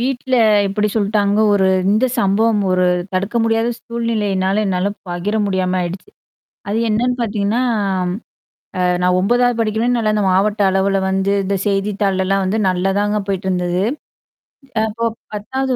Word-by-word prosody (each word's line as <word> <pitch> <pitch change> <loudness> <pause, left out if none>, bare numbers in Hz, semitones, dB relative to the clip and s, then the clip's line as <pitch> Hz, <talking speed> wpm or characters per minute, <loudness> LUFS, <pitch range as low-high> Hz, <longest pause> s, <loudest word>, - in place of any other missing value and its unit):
வீட்ல 260 +1 -1 0.3
எப்படி 210 +2 0
சொல்லிட்டாங்க.ஒரு 205 -1 +2 0.2
இந்த 215 +5 +2
சம்பவம் 210 +2 +2
ஒரு 185 0 +2 0.3
தடுக்க 195 +5 -2
முடியாத 225 +1 +1
சூழ்நிலையினால 210 -4 -1
என்னால 190 +1 0 0.2
பகிர 175 +4 -3
முடியாம 185 -1 0
ஆயிடுச்சு. 180 - -5 0.6
அது 210 - 0
என்னன்னு 240 +4 +1
பார்த்தீங்கன்னா, 215 0 -1 1.2
அ - - 0 0.2
நான் 180 0 +3
9வது 240 +4 +2
படிக்கனே, 220 +1 0
நல்ல 220 -2 +1
அ - - 0
இந்த 210 - +1
மாவட்ட 205 +3 +1
அளவுல 195 +1 +1
வந்து 190 +1 0
இந்த 200 +1 -1
செய்தித்தாள் 195 -1 0
எல்லாம் 195 0 +1
வந்து 205 +4 0
நல்ல 185 +1 0
தாங்க 205 +1 0
போயிட்டுருந்தது 185 -2 -1 1.1
அப்போ 225 +2 -5 0.3
10வது 260 +5 -2
205 Hz, 135 wpm, -18 LUFS, 190-220 Hz, 1.2 s, நான்